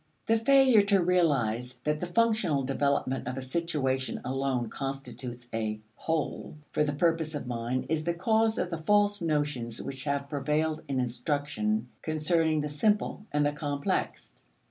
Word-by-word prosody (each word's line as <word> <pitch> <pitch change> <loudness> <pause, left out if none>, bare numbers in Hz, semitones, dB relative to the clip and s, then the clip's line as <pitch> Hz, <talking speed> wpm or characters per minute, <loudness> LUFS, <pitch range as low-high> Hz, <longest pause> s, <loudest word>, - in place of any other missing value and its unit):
The 225 0 +3
failure 260 -2 +6
to 200 -2 +3
realize 130 -9 +1
that 150 0 0
the 180 - -3
functional 185 -7 +2
development 135 -1 0
of 125 +1 -3
a - - -3
situation 135 -3 -1
alone 130 -2 -1
constitutes 125 -2 -6
a 110 -1 -2 0.2
"whole" 160 -1 -2 0.2
for 150 - +2
the 150 - 0
purpose 165 0 +1
of 145 - -4
mind 120 +1 -2
is 160 -1 0
the 170 +1 -1
cause 220 +4 +2
of 180 - -1
the 165 - -3
false 205 +3 +3
notions 145 -8 -1
which 135 0 -6
have 140 -1 -1
prevailed 155 +2 0
in 135 -2 -1
instruction 125 -3 -1
concerning 155 0 +1
the 150 - -2
simple 210 +6 0
and 145 0 +2
the 145 - +2
complex. 145 -1 -2
145 Hz, 155 wpm, -29 LUFS, 130-170 Hz, 0.2 s, failure